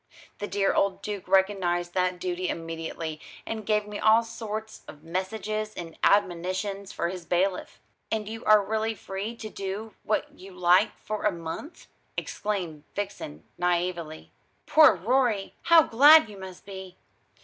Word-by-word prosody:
The 205 - -3
dear 200 -1 +1
old 195 -1 +1
Duke 205 -3 -5
recognised 185 -2 +2
that 180 -1 0
duty 180 0 -2
immediately, 165 -1 -5 0.2
and 220 -2 -5
gave 210 -1 +2
me 210 0 -6
all 220 +2 +5
sorts 220 -1 -6
of 150 - -12
messages 215 +5 -3
and 165 -2 -7
admonitions 195 +1 +1
for 170 - -2
his 180 -1 -6
bailiff." 180 +2 -1 0.3
"And 215 -2 -1
you 225 +1 -6
are 215 -2 +6
really 220 +1 -1
free 200 +4 -5
to 225 - -7
do 205 +2 -5
what 215 - -1
you 190 +1 -11
like 180 +3 +3
for 215 0 -5
a 210 - +4
month?" 170 - -7 0.3
exclaimed 180 -8 -3
Vixen 195 - -5 0.2
naïvely. 175 -2 -1 0.4
"Poor 310 -8 +7
Rorie! 220 +1 +1
How 335 -1 +8
glad 285 +1 +7
you 205 - -10
must 190 -1 -10
be!" 190 -2 -9
195 Hz, 150 wpm, -27 LUFS, 180-215 Hz, 0.4 s, How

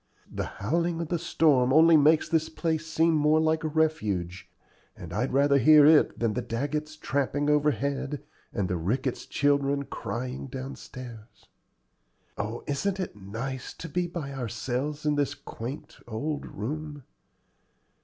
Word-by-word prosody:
The - - -3
howling 165 +10 0
of 165 -2 -4
the 175 - 0
storm 145 -6 +3
only 160 +3 +7
makes 155 +1 +5
this 160 -1 +1
place 160 -1 -2
seem 165 +1 +2
more 155 0 +4
like 160 0 +1
a - - 0
refuge, 110 - -1 0.5
and - - -8
I'd - - -1
rather 140 +1 +4
hear 150 0 +7
it 155 0 +5
than 115 -2 0
the 125 - -1
Daggetts 150 +6 -3
tramping 145 0 0
overhead 140 0 0 0.3
and 100 - -1
the 90 - -1
Ricketts 120 +10 -2
children 140 0 +1
crying 125 +2 -5
down 130 +1 -6
stairs. 120 -3 -11 0.9
Oh, 110 +3 -4
isn't 190 +7 -1
it 185 - -4
nice 115 +6 -6
to 165 - -7
be 175 +3 -1
by 170 -5 -5
ourselves 130 +4 -3
in 150 - +3
this 145 -2 0
quaint 125 +6 -8
old 145 +6 -3
room? 145 +6 -5
145 Hz, 145 wpm, -27 LUFS, 125-155 Hz, 0.9 s, only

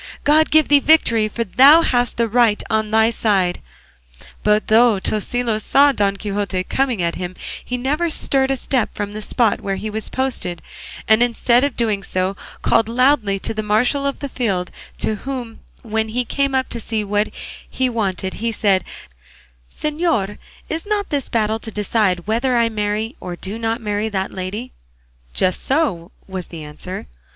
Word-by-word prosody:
God 310 +2 +4
give 315 -1 +4
thee 290 -1 +6
the - - -14
victory, 230 -9 +4
for 230 +2 -3
thou 280 - +6
hast 245 -4 +1
the 235 -1 +2
right 225 -2 +3
on 220 -1 +1
thy 220 +1 +4
side!" 195 -6 +1 0.8
But 210 0 +2
though 225 -1 +4
Tosilos 220 +2 -1
saw 285 +1 +5
Don 200 -6 0
Quixote 200 -2 -2
coming 250 -3 -1
at 170 0 0
him 180 0 -5 0.3
he 250 - -3
never 295 +7 0
stirred 270 -3 +1
a 270 - +1
step 255 -2 -1
from 205 -1 -3
the 215 +1 -6
spot 225 +1 +1
where 195 -1 -2
he 215 +2 -5
was 220 0 -1
posted; 255 -10 -3 0.4
and 220 +1 +5
instead 240 +1 +3
of 285 -3 -1
doing 215 -4 0
so 185 +1 -2 0.3
called 225 -1 +3
loudly 240 -4 +2
to - - -3
the 215 - -2
marshal 245 +7 +1
of 280 - -4
the 285 - -2
field, 195 -9 -2 0.3
to 215 - -1
whom 250 -2 -6 0.2
when 220 -1 -1
he 245 +3 -2
came 275 +2 0
up 260 0 +1
to 235 - -4
see 220 -1 -2
what 205 +1 0 0.4
he 260 - 0
wanted 195 -5 -2
he 230 +1 -2
said, 200 -4 +2 0.9
"Señor, 300 - -1 0.3
is 325 +1 -3
not 415 -2 -1
this 285 -3 -2
battle 220 -1 0
to 225 - -6
decide 205 -4 0
whether 240 +4 +1
I 230 -1 +3
marry 215 +3 -2
or 180 - -6
do 195 +5 -7
not 225 +1 -1
marry 210 0 -1
that 190 -2 -2
lady?" 200 +7 -5 0.6
"Just 185 -1 +1
so," 260 - 0 0.2
was 190 -2 -6
the 165 -2 -8
answer. 150 +5 -7
220 Hz, 180 wpm, -20 LUFS, 205-255 Hz, 0.9 s, thee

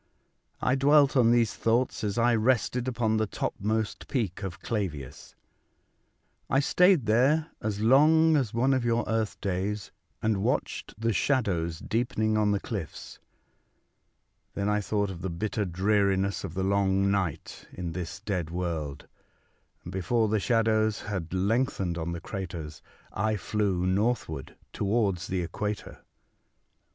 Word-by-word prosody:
I 125 - +2
dwelt 140 +1 +4
on 120 -3 +5
these 120 -2 +3
thoughts 115 +1 0
as 105 0 -1
I 120 +1 +4
rested 120 +2 +1
upon 110 -3 0
the 110 0 +1
topmost 110 +2 -2
peak 105 - -2
of 90 -5 -5
Clavius. 85 - -5 1.1
I 135 - +3
stayed 180 - +4
there 135 +9 +3
as 105 -1 -2
long 155 +7 +5
as 130 -8 +1
one 125 +4 +2
of 130 -2 +1
your 120 0 +1
earth 110 -1 -1
days, 100 +1 -2 0.3
and 110 -3 0
watched 105 - -2
the 115 0 +1
shadows 90 - 0
deepening 110 +1 -1
on 105 -1 +2
the 100 -1 +1
cliffs. - - -6 1.4
Then 100 0 -1
I 105 0 +1
thought 100 -1 -1
of 85 -2 -8
the 95 - -2
bitter 105 +5 -2
dreariness 95 +1 +1
of 90 -3 -6
the 95 - -1
long 100 0 +2
night 95 -7 -3
in 90 -2 -5
this 90 +2 -6
dead 90 -6 -2
world; 80 -5 -4 0.8
and 85 - -8
before 105 +5 +1
the 110 0 +2
shadows 110 -1 +2
had 95 -6 -4
lengthened 95 -2 0
on 80 +1 -3
the 85 -1 -5
craters 85 -5 -6 0.3
I 110 0 0
flew 95 -2 -1
northward 95 - -1 0.2
towards 100 -4 0
the 95 -1 -1
equator. 105 +4 -4
105 Hz, 140 wpm, -28 LUFS, 95-115 Hz, 1.4 s, on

